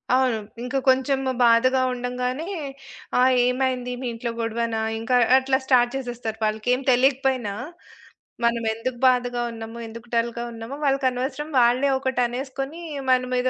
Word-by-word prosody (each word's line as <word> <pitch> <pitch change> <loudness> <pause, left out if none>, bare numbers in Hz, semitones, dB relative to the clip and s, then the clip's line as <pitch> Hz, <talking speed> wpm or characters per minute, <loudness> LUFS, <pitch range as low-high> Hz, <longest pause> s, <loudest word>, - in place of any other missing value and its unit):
అవును. 255 -3 +2 0.3
ఇంకా 255 +2 -2
కొంచెము 265 0 +2
బాధగా 255 +3 +4
ఉండగానే, 250 +5 -3 0.7
"ఆ - - +5 0.3
ఏమైంది? 250 -1 0
మీ 250 - -3
ఇంట్లో 235 +1 -4
గొడవనా?" 230 0 -1 0.2
ఇంకా 250 +3 0 0.2
అట్లా 265 0 +1
స్టార్ట్ 245 -1 +3
జేసేస్తారు. 240 -4 -4
వాళ్ళకేం 220 +5 0
తెలీకపోయినా, 260 -4 +2 0.9
మనమెందుకు 235 +1 -1
బాధగా 245 -1 0
ఉన్నామో 225 +1 -8
ఎందుకు 230 +2 -11
డల్‌గా 235 +1 -1
ఉన్నామో 230 +5 -7
వాళ్ళకనవసరం. 270 +2 0
వాళ్ళే 250 +4 +3
ఒకటనేసుకొని 265 +4 -2 0.3
మన 255 0 +4
మీద 250 +1 +1
250 Hz, 120 wpm, -24 LUFS, 235-265 Hz, 0.9 s, ఆ